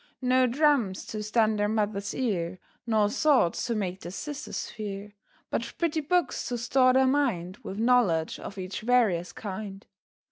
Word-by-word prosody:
No 255 0 +4
drums 255 -7 +2
to 215 - -5
stun 215 0 +2
their 205 0 +1
Mother's 205 -2 -1
ear, 185 -8 -1 0.3
Nor 215 -2 +2
swords 275 - +3
to 235 - -1
make 190 -3 -3
their 175 - -6
sisters 290 +9 -5
fear; 205 -1 -6 0.4
But 235 +1 -2
pretty 330 -2 0
books 355 +4 0
to 245 - -2
store 255 +2 +3
their 265 +1 +5
mind 235 -10 0
With 195 - -8
knowledge 220 -9 +2
of 200 - -8
each 185 +1 -5
various 215 -7 +2
kind. 200 -1 -7
215 Hz, 155 wpm, -27 LUFS, 195-255 Hz, 0.4 s, their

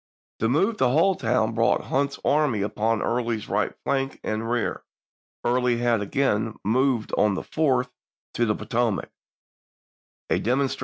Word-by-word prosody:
The 115 - +1
move 195 - +2
to - - +2
Halltown 125 - +2
brought 115 +1 +2
Hunter's 140 +1 -1
army 140 -9 +2
upon 110 +2 0
Early's 115 -2 -1
right - - 0
flank 135 -1 -1
and 110 +1 -2
rear. 120 -1 -1 0.6
Early 125 0 +2
had 120 -2 +1
again 110 0 0
moved 125 +2 +1
on 105 -2 +3
the - - -4
4th 130 -5 0 0.4
to 120 - +1
the 105 - +1
Potomac 115 -4 -1 0.6
— - - -82
a - - +3
demonstra 130 +4 0
Aug. - - -15
120 Hz, 150 wpm, -25 LUFS, 110-135 Hz, 0.6 s, on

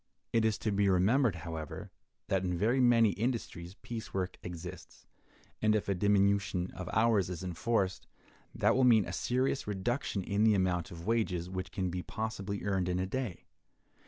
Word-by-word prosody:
It 115 -1 +3
is 110 -2 +2
to 110 - -2
be 100 0 +2
remembered, 105 +5 +3
however, 80 -2 -6 0.4
that 95 -1 +1
in 90 -1 -1
very 115 +8 +2
many 115 -4 +5
industries 100 -4 -3
piece 115 -4 -6
work 95 -1 -2
exists, 90 -1 -9 0.6
and 110 0 +3
if 105 - -1
a 100 - +2
diminution 100 -1 +2
of 90 - -7
hours 110 -4 +3
is 90 -1 -5
enforced, 95 +2 -1 0.5
that - - +3
will 130 - +3
mean 115 -5 +6
a 90 - -6
serious 130 +4 0
reduction 105 +1 -2
in 100 +3 0
the 110 -1 +5
amount 90 -3 0
of 85 0 -9
wages 95 -6 0
which 95 -2 -4
can 90 -1 -2
be 90 +1 -3
possibly 100 -1 -4
earned 95 -3 0
in 90 - 0
a 90 - 0
day. 115 -2 -4
100 Hz, 175 wpm, -32 LUFS, 90-110 Hz, 0.6 s, mean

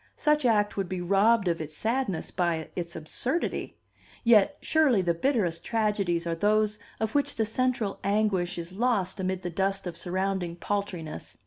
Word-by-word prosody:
Such 300 -2 +2
act 210 -2 +2
would 195 -3 -1
be 185 - -3
robbed 200 +4 +3
of 170 -1 0
its 155 -1 -7
sadness 225 -6 -1
by 170 -3 -1
its 170 -1 -4
absurdity. 250 - -2 0.5
Yet, 235 +4 +5
surely, 280 -11 +3
the 170 -1 +2
bitterest 175 - 0
tragedies 205 -6 0
are 170 - -1
those 215 +4 +1 0.2
of 220 -1 -1
which 285 -1 +1
the 220 - +1
central 230 -2 -1
anguish 200 -3 +1
is 170 +1 -6
lost 205 -4 0
amid 185 0 -2
the 175 - -3
dust 195 +2 -1
of 175 -2 -4
surrounding 185 0 -2
paltriness. 180 - -4
195 Hz, 160 wpm, -28 LUFS, 175-220 Hz, 0.5 s, Yet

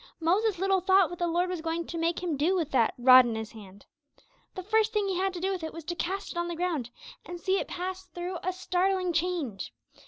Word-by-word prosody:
Moses 380 +5 +1
little 385 +1 +1
thought 380 -1 +4
what 350 - -7
the 345 - +1
Lord 350 +2 +1
was 360 -3 -4
going 330 +1 -2
to - - -7
make 335 +2 -1
him 340 -4 -1
do 315 +7 +1
with 335 -5 -1
that 235 -4 +2
'rod 255 +1 +8
in 235 -2 -2
his 220 -1 -5
hand'! 200 -2 -13 0.7
The 370 - -5
first 440 +3 +2
thing 420 -2 +1
he 380 - -1
had 385 0 +1
to - - -4
do 380 +2 -1
with 370 -3 -4
it 320 - -5
was 330 - -8
to 345 +3 -4
'cast 380 +3 -3
it 345 - -4
on 345 - -1
the 345 - -4
ground,' 325 -8 -2 0.3
and 350 0 -8
see 380 +2 +1
it - - -4
pass 370 +1 -5
through 350 +1 -5
a 370 - -1
startling 370 0 0
change. 325 - -2
350 Hz, 250 wpm, -28 LUFS, 325-375 Hz, 0.7 s, rod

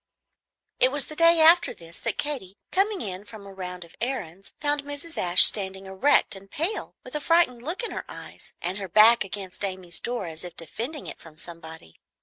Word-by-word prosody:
It 255 - +4
was 290 0 +3
the 305 - -8
day 335 +1 +6
after 335 +2 +5
this 165 0 -9
that - - -2
Katy, 250 -11 -3
coming 395 +1 +1
in 190 -1 -6
from 210 -1 -12
a 195 - -11
round 180 -2 -7
of 170 - -19
errands, 195 -8 -5
found 290 -1 0
Mrs. 290 +3 -6
Ashe 180 0 +6
standing 190 -2 +3
erect 190 +6 +3
and 195 0 -13
pale, 335 - -2
with - - -12
a 300 - -2
frightened 310 -7 +2
look 330 - -2
in 465 - -1
her - - -6
eyes, - - -10
and 180 +4 -3
her 195 -2 -6
back 220 +5 +7
against 195 0 -7
Amy's 185 -3 -4
door, 240 -4 -4
as 160 0 -4
if 175 -2 -10
defending 235 - -5
it - - -8
from 160 -2 -16
somebody. 160 - -10
200 Hz, 200 wpm, -25 LUFS, 180-290 Hz, -, back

